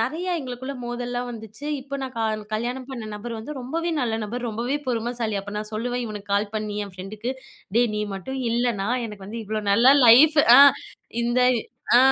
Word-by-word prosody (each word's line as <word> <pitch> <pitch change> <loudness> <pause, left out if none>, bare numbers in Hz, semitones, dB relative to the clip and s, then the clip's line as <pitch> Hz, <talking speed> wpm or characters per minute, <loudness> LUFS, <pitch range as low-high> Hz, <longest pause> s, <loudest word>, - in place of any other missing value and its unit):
நெறையா 330 +10 -1
எங்களுக்குள்ள 260 +1 -6
மோதல்லாம் 245 0 -3
வந்துச்சு. 220 +3 -10 0.2
இப்ப 280 +1 -6
நான் 260 -1 -5
க 230 - -2 0.3
கல்யாணம் 245 +4 -3
பண்ண 235 -5 -6
நபர் 230 +2 -6
வந்து 225 +7 -7
ரொம்பவே 330 +7 -2
நல்ல 235 -4 0
நபர். 240 +3 -4
ரொம்பவே 235 +6 -2
பொறுமைசாலி. 235 -2 -2
அப்போ 205 +1 -8
நான் 210 0 -6
சொல்லுவேன் 245 +2 -2
இவனுக்கு 205 -2 -6
கால் 205 +1 0
பண்ணி, 210 -1 -3
என் 190 - -13
ஃப்ரெண்டுக்கு. 210 +7 -5 0.4
டேய் 235 -2 +3
நீ 210 - -1
மட்டும் 265 +8 -5
இல்லன்னா, 230 -4 0 0.2
எனக்கு 205 -3 -10
வந்து 225 +2 -6
இவ்ளோ 215 +1 -3
நல்ல 250 +6 +6
லைஃப் 295 +7 +7 0.2
அ - - +9 0.6
இந்த 240 +1 +1 0.6
அ - - +9
235 Hz, 180 wpm, -24 LUFS, 215-250 Hz, 0.6 s, அ